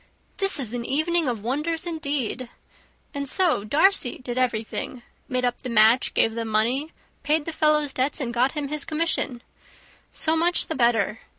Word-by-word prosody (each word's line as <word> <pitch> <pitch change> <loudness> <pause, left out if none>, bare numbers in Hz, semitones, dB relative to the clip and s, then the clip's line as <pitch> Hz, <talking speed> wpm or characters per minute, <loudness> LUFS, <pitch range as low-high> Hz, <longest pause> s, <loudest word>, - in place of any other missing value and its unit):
"This 390 -5 +2
is 245 -4 -2
an 240 -1 -3
evening 315 +5 0
of 230 -5 -3
wonders, 305 +8 -1
indeed! 280 -7 -3 0.6
And 280 -1 -3
so, 345 - +2
Darcy 295 - +2
did 245 -1 -6
everything; 240 0 -2 0.3
made 255 -1 0
up 245 - -2
the 255 - -5
match, 225 +2 +4
gave 225 - +3
the 230 0 -3
money, 235 +8 0 0.3
paid 295 +1 +1
the 330 - -4
fellow's 300 -2 +2
debts, 270 +4 0
and 245 -4 -3
got 250 +3 +2
him 295 -3 -3
his 300 -1 -1
commission! 305 -6 0 0.7
So 320 0 +1
much 340 +2 +2
the - - -4
better. 225 -5 +1
270 Hz, 170 wpm, -24 LUFS, 240-310 Hz, 0.7 s, match